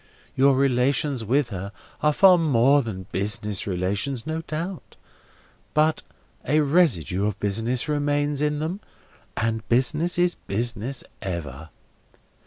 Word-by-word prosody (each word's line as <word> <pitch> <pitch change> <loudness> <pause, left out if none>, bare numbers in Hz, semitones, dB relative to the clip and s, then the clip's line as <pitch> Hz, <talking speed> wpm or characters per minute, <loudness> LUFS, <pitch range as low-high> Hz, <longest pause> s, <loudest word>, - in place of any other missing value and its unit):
Your 135 +1 +4
relations 135 0 +1
with 130 +4 +1
her 100 +1 -5 0.3
are 150 - +3
far 180 +3 +6
more 140 -2 +4
than 100 -7 -6
business 105 0 -2
relations, 100 +7 -1
no 160 +1 -3
doubt; 165 +3 -6 0.8
but 155 +1 +2 0.4
a 150 +3 +2
residue 125 - +2
of 105 - -4
business 115 +6 0
remains 145 -1 0
in 150 0 +1
them, 160 +6 -3 0.6
and 115 0 -2
business 150 +9 +1
is 175 0 +3
business 120 +4 -3 0.2
ever. 80 -5 -6
130 Hz, 120 wpm, -24 LUFS, 105-150 Hz, 0.8 s, far